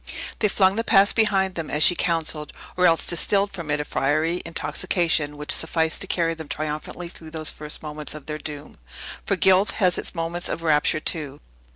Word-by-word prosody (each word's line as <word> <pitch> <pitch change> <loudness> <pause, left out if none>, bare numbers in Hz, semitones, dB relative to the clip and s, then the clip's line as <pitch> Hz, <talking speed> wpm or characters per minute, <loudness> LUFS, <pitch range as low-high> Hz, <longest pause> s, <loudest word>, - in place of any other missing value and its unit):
They 215 - +3
flung 195 -1 +2
the 230 - 0
past 200 -2 +4
behind 195 -4 +2
them, 165 -3 -5
as 150 +1 +2
she - - +7
counselled, 160 -3 -1 0.2
or 180 0 +4
else 165 -1 +3
distilled 200 +3 +3
from 170 -5 -7
it 145 0 0
a 150 - -3
fiery, 155 +6 0
intoxication, 160 -1 0
which 150 0 -3
sufficed 160 0 +1
to 195 - -2
carry 165 -2 +1
them 160 -2 -9
triumphantly 155 +4 -5
through 165 -2 -10
those 155 -1 -3
first 150 0 -7
moments 150 0 -6
of 150 - -10
their 155 0 -5
doom. 145 - -8 0.5
For - - +2
guilt 190 +1 +3
has 180 -4 +2
its - - -5
moment 165 +1 -4
of 165 - -4
rapture 155 -1 +2
too. 150 -4 -2
165 Hz, 195 wpm, -23 LUFS, 150-180 Hz, 0.5 s, she